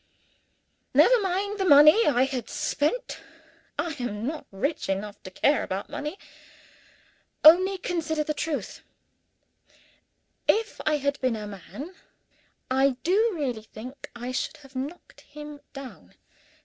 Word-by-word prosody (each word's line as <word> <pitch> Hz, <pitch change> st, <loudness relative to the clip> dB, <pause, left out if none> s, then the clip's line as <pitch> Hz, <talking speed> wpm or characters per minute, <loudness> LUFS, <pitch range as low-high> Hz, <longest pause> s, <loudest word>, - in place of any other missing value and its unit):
Never -, -, +6 dB
mind 400 Hz, +2 st, -1 dB
the -, -, +2 dB
money 305 Hz, +6 st, +7 dB
I 260 Hz, -4 st, +4 dB
had 260 Hz, -4 st, -3 dB
spent 390 Hz, +13 st, -1 dB, 0.6 s
I 320 Hz, +3 st, -1 dB
am 225 Hz, -3 st, -3 dB
not 300 Hz, +3 st, -4 dB
rich 280 Hz, +10 st, -2 dB
enough 200 Hz, +2 st, -3 dB
to 185 Hz, -, -9 dB
care 285 Hz, +10 st, +2 dB
about 190 Hz, +2 st, -4 dB
money 300 Hz, +6 st, -4 dB, 1.3 s
only 370 Hz, +5 st, +7 dB
consider 320 Hz, -4 st, -1 dB
the 305 Hz, -, -2 dB
trouble. 300 Hz, 0 st, -2 dB, 1.8 s
If 445 Hz, +1 st, +1 dB
I 305 Hz, -1 st, +3 dB
had 280 Hz, 0 st, -2 dB
been 255 Hz, -3 st, +1 dB
a 210 Hz, -1 st, -5 dB
man, 210 Hz, -, -9 dB, 0.8 s
I 265 Hz, 0 st, +3 dB
do 420 Hz, +7 st, +3 dB
really 255 Hz, -8 st, -2 dB
think 235 Hz, +5 st, -10 dB
I 245 Hz, +1 st, -5 dB
should 315 Hz, +5 st, -3 dB
have 270 Hz, 0 st, -17 dB
knocked 285 Hz, +7 st, -7 dB
him 295 Hz, 0 st, -10 dB
down. 275 Hz, -2 st, -11 dB
290 Hz, 130 wpm, -26 LUFS, 250-335 Hz, 1.8 s, money